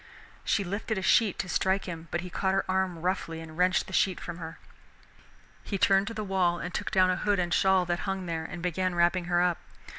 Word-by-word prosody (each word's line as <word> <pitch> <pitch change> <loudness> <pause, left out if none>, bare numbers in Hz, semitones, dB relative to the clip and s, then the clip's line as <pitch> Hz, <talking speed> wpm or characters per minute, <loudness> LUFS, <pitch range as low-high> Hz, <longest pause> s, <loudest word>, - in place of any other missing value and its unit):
She 200 - +1
lifted 200 +3 -3
a 190 - -3
sheet 215 -1 +3
to 180 - -3
strike 190 +2 +1
him, 170 -2 -7
but 175 - -2
he 180 0 -8
caught 190 +2 0
her 195 - +1
arm 185 -3 -1
roughly 180 -3 -2
and 160 -1 -10
wrenched 180 +2 +2
the 190 - -11
sheet 190 -1 +2
from 175 0 -7
her. 165 -1 -7 1.1
He 200 - -3
turned 195 +2 +3
to 230 - -4
the 215 - -3
wall 185 -3 +1
and 175 +1 -6
took - - -2
down 185 -1 +4
a - - +1
hood 205 0 +1
and 175 -2 0
shawl 190 0 +3
that 175 0 -1
hung 195 -1 -3
there, 165 -2 -3
and 170 +1 -7
began 180 +1 -1
wrapping 175 +1 +2
her 175 0 +2
up. 180 -2 +1
185 Hz, 235 wpm, -28 LUFS, 175-190 Hz, 1.1 s, down